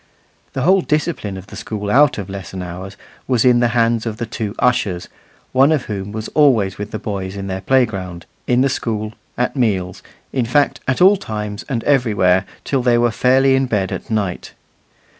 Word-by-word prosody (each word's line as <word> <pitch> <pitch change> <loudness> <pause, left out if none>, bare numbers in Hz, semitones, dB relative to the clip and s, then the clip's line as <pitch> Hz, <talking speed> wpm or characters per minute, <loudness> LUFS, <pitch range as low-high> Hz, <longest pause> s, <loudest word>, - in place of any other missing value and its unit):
The 130 - -2
whole 190 +4 +4
discipline 150 - -2
of 95 - -9
the 105 - -12
school 105 -1 -4
out 145 +3 +5
of 100 -3 -5
lesson 95 -1 -6
hours 90 +3 -8 0.3
was 125 -2 +2
in 125 -1 +5
the 120 - +3
hands 115 0 +2
of 110 -1 -4
the 120 - -3
two 110 -2 -5
ushers, 100 -8 0 0.4
one 135 +3 +4
of 150 -5 +1
whom 100 -1 -5
was 110 +1 -5
always 115 -11 +3
with 105 0 -4
the - - -4
boys 95 -2 -4
in 100 -1 -5
their 95 -1 -4
playground, 95 -7 0 0.2
in 125 0 +3
the 135 - +4
school, 110 -4 -3 0.2
at 125 +3 0
meals 100 -8 -1 0.3
in 130 -3 0
fact, 145 +4 +2
at 130 +6 0
all 195 +2 +7
times 105 - -5
and 120 -5 -2
every 125 -7 +2
where, 95 0 +3 0.2
till 135 -2 0
they 120 -1 +3
were 120 0 +2
fairly 130 +4 +3
in 135 0 +1
bed 100 -6 -1
at - - -6
night. 100 -5 -2
110 Hz, 195 wpm, -19 LUFS, 100-130 Hz, 0.4 s, all